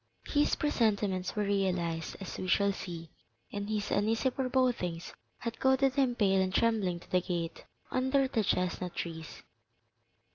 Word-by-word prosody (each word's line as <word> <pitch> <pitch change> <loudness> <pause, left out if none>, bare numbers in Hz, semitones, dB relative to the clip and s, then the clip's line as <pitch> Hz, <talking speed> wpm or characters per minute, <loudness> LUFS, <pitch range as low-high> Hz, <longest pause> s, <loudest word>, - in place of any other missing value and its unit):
His 295 0 +2
presentiments 205 -9 +1
were 210 - +1
realized, 180 -5 0
as 195 - -6
we 185 - -3
shall 200 +2 +3
see, 165 -4 -7 0.4
and 205 0 -3
his 210 -1 -1
uneasy 225 +5 +2
forebodings 245 -10 0 0.2
had 230 -1 -5
goaded 265 0 +3
him 265 -3 +2
pale 195 -4 +3
and 185 0 0
trembling 200 -5 +2
to - - -18
the 180 - +3
gate 170 -2 -3 0.3
under 265 +1 +2
the 230 -4 0
chestnut 180 -1 -1
trees. 160 -2 -6
200 Hz, 145 wpm, -31 LUFS, 180-245 Hz, 0.4 s, shall